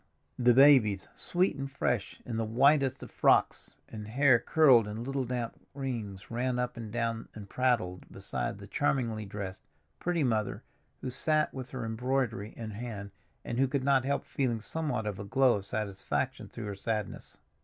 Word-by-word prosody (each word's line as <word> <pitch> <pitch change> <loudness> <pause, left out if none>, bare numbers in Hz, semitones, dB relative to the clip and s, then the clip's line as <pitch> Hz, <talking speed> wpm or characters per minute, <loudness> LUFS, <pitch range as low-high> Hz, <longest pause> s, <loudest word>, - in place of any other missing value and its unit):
The 120 -1 +5
babies, 125 -8 +6
sweet 180 +2 +1
and 135 0 -4
fresh, 125 -6 -2
in 115 -2 -3
the 115 - 0
whitest 135 +3 +3
of - - -10
frocks, - - +2
and 105 -1 -8
hair 130 +1 +4
curled 130 -9 +5
in 105 +2 -5
little 135 0 -2
damp 120 -1 -3 0.2
rings, 115 -9 -5
ran 125 +1 0
up 125 0 -2
and 115 -3 -7
down 115 -1 -2
and 105 -2 -8
prattled 115 -8 0
beside - - -4
the - - -10
charmingly 115 -5 0
dressed, 100 -1 -6 0.4
pretty 175 -3 0
mother, 110 -5 0 0.4
who 130 - -4
sat 155 +4 +1
with 130 -1 -6
her 130 -3 -5
embroidery 115 -2 -1
in 110 -2 -5
hand 105 -2 -6 0.3
and 120 - -3
who 135 - +4
could 135 0 -1
not 135 -2 +3
help 140 +1 -1
feeling 125 -5 -1
somewhat 125 -2 -2
of 105 -2 -3
a - - -4
glow 130 +4 +4
of 100 0 -8
satisfaction 100 -3 -2
through 115 - -7
her 100 -1 -4
sadness. 105 +1 -4
120 Hz, 175 wpm, -30 LUFS, 110-135 Hz, 0.4 s, babies